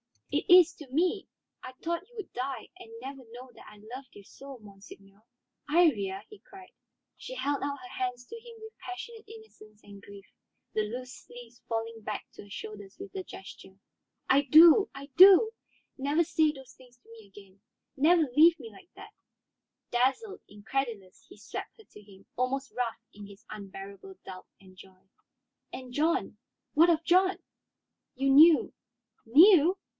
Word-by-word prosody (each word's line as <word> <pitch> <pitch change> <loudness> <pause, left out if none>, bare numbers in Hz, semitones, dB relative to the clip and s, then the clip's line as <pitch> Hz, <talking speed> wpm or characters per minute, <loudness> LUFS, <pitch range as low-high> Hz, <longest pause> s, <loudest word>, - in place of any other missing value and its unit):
"It - - -2
is, 355 -2 +7
to 300 - -12
me. 355 +8 -1 0.3
I 255 - -10
thought 340 +7 -5
you 485 - -24
would 420 -4 -8
die 255 -2 -5
and 225 - -13
never 270 +1 -8
know 250 +2 -12
that - - -16
I 210 - -14 0.2
loved 265 +1 -10
you 205 - -13
so, 275 +6 -12
monseigneur." 200 -1 -16 0.5
"Iría!" 215 - +2
he 425 - -14
cried. 380 -1 -16 0.5
She - - -9
held 285 - -2
out 280 0 -3
her 370 - -11
hands 250 -1 -3
to 460 - -10
him 470 0 -14
with 440 0 -12
passionate 440 +5 -9
innocence 420 - -16
and 200 -1 -14
grief, 200 0 -14 0.5
the 215 - 0
loose 250 +4 -7
sleeves 240 0 -14
falling 225 0 -4
back 210 -1 -6
to - - -12
her 205 - -17
shoulders 200 -1 -9
with 395 +1 -10
the 380 -1 -6
gesture. 190 0 -13 0.5
"I 275 +2 +4
do, 325 - +7
I 280 0 -9
do. 390 +4 +8 0.5
Never 290 +5 +1
say 310 -1 +1
those 265 -3 -14
things 250 -1 -21
to 240 - -28
me 225 -3 -15
again, 195 -1 -17 0.4
never 325 +4 +4
leave 330 +2 +6
me 230 -4 -10
like 370 - -18
that." - - -13 0.8
Dazzled, 265 - -1
incredulous, 210 -2 -5
he - - -15
swept - - -8
her 440 - -17
to 210 - -17
him, 195 -1 -19
almost 265 +2 -2
rough 245 -2 -3
in 205 -1 -11
his 200 -1 -16
unbearable 200 - -10
doubt 185 -1 -10
and 185 -1 -19
joy. 190 0 -18 0.6
"And 255 -1 -9
John? 330 +7 -1 0.4
What 330 +3 +5
of 330 -1 +1
John?" 370 +3 +2 0.8
"You 270 +1 0
knew 310 +1 +6 0.3
" 235 -2 -46
"Knew? 340 - +6
260 Hz, 170 wpm, -28 LUFS, 210-340 Hz, 0.8 s, do